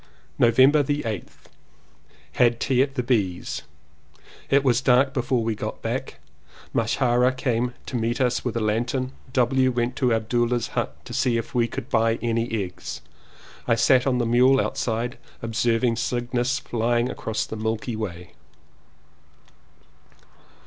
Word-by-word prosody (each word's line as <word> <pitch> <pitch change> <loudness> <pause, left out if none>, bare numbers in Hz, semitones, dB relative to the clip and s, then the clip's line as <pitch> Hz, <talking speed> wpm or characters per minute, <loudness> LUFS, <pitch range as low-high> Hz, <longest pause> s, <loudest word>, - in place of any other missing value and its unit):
November 130 +5 +5
8th. 125 -8 -4 0.9
Had 120 +5 +2
tea 130 -2 +2
at 135 0 0
the 125 - -1
B.'s. 105 -8 -1 0.9
It 140 0 +4
was 125 -2 +3
dark 135 +1 +3
before 125 -2 0
we 115 0 0
got - - -6
back. - - -4 0.5
Masharia 120 +2 +2
came 125 -1 -1
to - - -6
meet 115 0 -1
us 125 -2 +1
with 120 -2 -2
a - - -1
lantern. 120 +4 -1 0.2
W. 130 +1 +3
went 120 +1 -1
to 125 -2 +2
Abdulea's 120 +1 0
hut - - -2
to - - -8
see 120 -2 +1
if 115 - -4
he 120 -2 +1
could - - -6
buy 115 0 +3
any 115 0 -1
eggs. 90 -1 -7 0.7
I 115 - +4
sat 125 +2 +4
on 130 -2 +2
the 120 - 0
mule 125 +3 +4
outside 120 0 -2 0.2
observing 115 +1 +1
Cygnus 120 +1 -1
flying 120 +1 0
across 110 -4 -3
the - - -7
Milky 110 +2 -2
Way. 90 -6 -6
120 Hz, 140 wpm, -24 LUFS, 115-125 Hz, 0.9 s, November